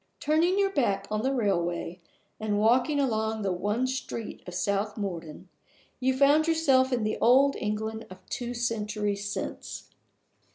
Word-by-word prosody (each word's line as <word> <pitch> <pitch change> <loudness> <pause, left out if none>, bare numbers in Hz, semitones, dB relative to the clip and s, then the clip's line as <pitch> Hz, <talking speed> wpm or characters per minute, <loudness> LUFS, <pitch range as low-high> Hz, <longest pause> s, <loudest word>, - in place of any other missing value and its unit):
Turning 325 +5 +2
your 395 -1 +2
back 200 - 0
on 215 0 0
the 265 +3 0
railway, 180 -7 -1 0.4
and 215 -1 -1
walking 250 +7 +3
along 220 -4 0
the 195 - 0
one 205 +7 0
street 255 -3 -4
of 180 - -7
South 200 +4 -1
Morden, 170 -6 -5 0.5
you 260 0 +1
found 290 +3 +5
yourself 270 -5 +3
in 240 -3 0
the 215 - -1
old 270 +4 +5
England 220 +1 -3
of 185 - -10
two 245 -2 -4
centuries 210 -3 -2
since. - - -6
220 Hz, 150 wpm, -28 LUFS, 205-265 Hz, 0.5 s, found